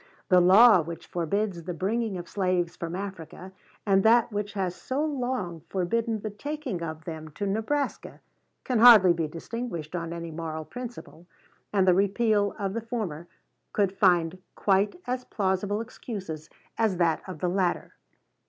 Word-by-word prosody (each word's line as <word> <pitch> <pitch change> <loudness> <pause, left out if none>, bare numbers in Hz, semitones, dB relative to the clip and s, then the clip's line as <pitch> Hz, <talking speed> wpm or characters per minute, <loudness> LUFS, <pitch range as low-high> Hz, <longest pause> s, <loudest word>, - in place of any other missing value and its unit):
The 180 -2 +6
law 195 +2 +7
which 165 +1 -7
forbids 180 +2 -2
the 175 +1 -5
bringing 210 +3 -1
of 175 -1 -7
slaves 180 -3 0
from 170 0 -5
Africa, 190 -1 -7 0.3
and 195 -2 +4
that 230 +2 +4
which 205 0 -3
has 190 -3 -1
so 280 +4 -2
long 250 - -3
forbidden 220 +4 -1
the 215 - -4
taking 285 - -5
of 160 -1 -6
them 160 -2 -7
to 205 - -3
Nebraska, 220 +9 -2 0.4
can 250 -3 0
hardly 215 -7 +9
be 165 -2 -2
distinguished 170 0 -6
on 170 -1 -3
any 170 -1 -6
moral 160 -1 -5
principle; 240 -8 -9 0.4
and 195 -2 +2
the 180 - +7
repeal 205 +2 +2
of 195 -2 -2
the 230 - -2
former 210 -9 -4 0.5
could 200 -3 +2
find 180 -2 +3 0.2
quite 200 +1 +2
as 250 0 -2
plausible 200 +1 -1
excuses 190 -9 -7 0.3
as 215 -5 +2
that 170 -2 +2
of 185 - -6
the 180 - -1
latter." 180 -1 -1
195 Hz, 155 wpm, -27 LUFS, 170-220 Hz, 0.5 s, hardly